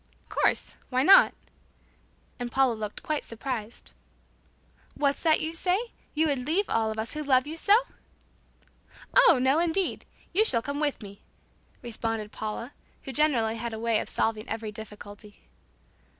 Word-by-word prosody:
"Of -, -, -34 dB
course. -, -, +1 dB
Why 255 Hz, 0 st, +1 dB
not?" 390 Hz, +6 st, +8 dB, 1.1 s
and 245 Hz, -1 st, -4 dB
Paula 265 Hz, -1 st, +3 dB
looked 215 Hz, -2 st, -6 dB
quite 305 Hz, -1 st, -2 dB
surprised. 230 Hz, -, -6 dB, 1.0 s
"What's 280 Hz, -1 st, 0 dB
that 315 Hz, -2 st, +3 dB
you 320 Hz, +1 st, -2 dB
say? 360 Hz, +2 st, +1 dB, 0.4 s
You 315 Hz, +2 st, +3 dB
would 275 Hz, -4 st, -1 dB
leave 380 Hz, +6 st, +1 dB
all 225 Hz, -1 st, +1 dB
of 220 Hz, -, -5 dB
us 220 Hz, +1 st, -3 dB
who 305 Hz, -, -4 dB
love 260 Hz, -3 st, +3 dB
you 310 Hz, +2 st, -5 dB
so?" 405 Hz, +6 st, +5 dB, 1.4 s
"Oh, 335 Hz, -, +6 dB
no 265 Hz, +4 st, +3 dB
indeed, 345 Hz, +2 st, 0 dB, 0.3 s
you 415 Hz, +5 st, +4 dB
shall 265 Hz, -, +3 dB
all -, -, +1 dB
come 285 Hz, 0 st, -4 dB
with 290 Hz, -6 st, -1 dB
me," 200 Hz, 0 st, -11 dB, 0.6 s
responded 225 Hz, -2 st, -4 dB
Paula, 220 Hz, +5 st, -5 dB, 0.3 s
who 270 Hz, -, -7 dB
generally 235 Hz, -7 st, +2 dB
had 235 Hz, 0 st, -4 dB
a 220 Hz, -, -5 dB
way 230 Hz, -1 st, +1 dB
of -, -, -5 dB
solving 220 Hz, -1 st, -1 dB
every 220 Hz, -1 st, -4 dB
difficulty. 210 Hz, 0 st, -11 dB
250 Hz, 160 wpm, -27 LUFS, 220-305 Hz, 1.4 s, not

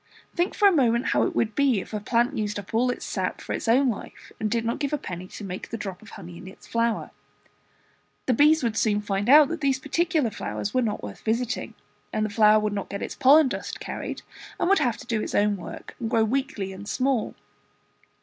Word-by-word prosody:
Think 350 Hz, +1 st, 0 dB
for 410 Hz, -, +5 dB
a -, -, +6 dB
moment 245 Hz, -6 st, +2 dB
how -, -, +2 dB
it -, -, 0 dB
would 220 Hz, -1 st, +1 dB
be, 270 Hz, -5 st, +2 dB
if 190 Hz, -, -9 dB
a 210 Hz, -, -1 dB
plant 240 Hz, +5 st, +1 dB
used 210 Hz, -1 st, -2 dB
up 200 Hz, 0 st, -8 dB
all 245 Hz, +3 st, +2 dB
its 245 Hz, -, -3 dB
sap -, -, -2 dB
for -, -, -5 dB
its -, -, -4 dB
own 260 Hz, +4 st, +4 dB
life, 205 Hz, -, -10 dB
and 215 Hz, -, -1 dB
did 230 Hz, +1 st, -1 dB
not 230 Hz, -, -1 dB
give 285 Hz, +1 st, 0 dB
up 270 Hz, -, -7 dB
any 180 Hz, +1 st, -6 dB
to 210 Hz, -, -10 dB
make 185 Hz, -1 st, -6 dB
the 230 Hz, -, -4 dB
drop 195 Hz, -4 st, -6 dB
of 220 Hz, -, -14 dB
honey 175 Hz, -4 st, -10 dB
in 185 Hz, -, -11 dB
its 190 Hz, -, -13 dB
flower. 230 Hz, -1 st, -1 dB, 1.1 s
The 255 Hz, -, +2 dB
bees 300 Hz, +4 st, +5 dB
would 230 Hz, -2 st, 0 dB
soon 210 Hz, -2 st, +1 dB
find 205 Hz, +1 st, -2 dB
out 295 Hz, +1 st, +8 dB
that 335 Hz, -2 st, -4 dB
these 275 Hz, -2 st, +2 dB
particular 300 Hz, -2 st, 0 dB
flowers 200 Hz, -, -4 dB
were 255 Hz, -, +2 dB
not 220 Hz, -4 st, -2 dB
worth 100 Hz, -1 st, -8 dB
visiting, 235 Hz, +2 st, -2 dB, 0.4 s
and 215 Hz, -, 0 dB
the 215 Hz, -, -4 dB
flower 215 Hz, 0 st, +5 dB
would 210 Hz, -1 st, -1 dB
not 200 Hz, -1 st, -4 dB
get 200 Hz, -, -4 dB
its -, -, -4 dB
pollen 285 Hz, +2 st, +6 dB
dust 255 Hz, -, -5 dB
carried, -, -, -6 dB, 0.4 s
and -, -, +1 dB
would 395 Hz, -, +5 dB
have 240 Hz, -3 st, +1 dB
to -, -, -11 dB
do 230 Hz, -3 st, -1 dB
its -, -, -4 dB
own 205 Hz, 0 st, +3 dB
work 185 Hz, -, -9 dB
and 230 Hz, -3 st, -3 dB
grow 225 Hz, -2 st, +3 dB
weakly 220 Hz, -5 st, -2 dB
and 200 Hz, +2 st, -9 dB
small. 260 Hz, -3 st, 0 dB
230 Hz, 235 wpm, -25 LUFS, 205-265 Hz, 1.1 s, out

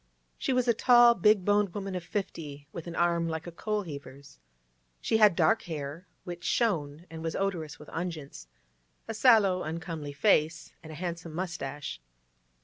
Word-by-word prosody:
She -, -, -1 dB
was 250 Hz, -1 st, +1 dB
a 235 Hz, -, +5 dB
tall, 240 Hz, +1 st, +6 dB
big 210 Hz, -2 st, +3 dB
boned 205 Hz, -3 st, +2 dB
woman 195 Hz, -2 st, -4 dB
of 180 Hz, -2 st, -4 dB
fifty, 155 Hz, -7 st, -5 dB
with 170 Hz, +1 st, -8 dB
an 170 Hz, -, -6 dB
arm 170 Hz, -1 st, +2 dB
like 160 Hz, 0 st, -4 dB
a 175 Hz, -, -7 dB
coalheaver's. 145 Hz, -, -5 dB, 0.6 s
She 225 Hz, -, +1 dB
had 210 Hz, -5 st, +6 dB
dark 225 Hz, +5 st, +3 dB
hair, 150 Hz, +2 st, -5 dB, 0.2 s
which 175 Hz, -2 st, -7 dB
shone 165 Hz, -10 st, 0 dB
and 160 Hz, -1 st, -7 dB
was 165 Hz, 0 st, -3 dB
odorous 175 Hz, -7 st, -2 dB
with 150 Hz, -, -13 dB
unguents; 160 Hz, -, -5 dB, 0.6 s
a 225 Hz, -, -3 dB
sallow, 215 Hz, -6 st, +5 dB
uncomely 160 Hz, -2 st, -5 dB
face, 155 Hz, +2 st, +2 dB
and 160 Hz, -2 st, -10 dB
a -, -, -8 dB
handsome 170 Hz, -1 st, -5 dB
moustache. 145 Hz, -, -5 dB
170 Hz, 160 wpm, -29 LUFS, 155-200 Hz, 0.6 s, tall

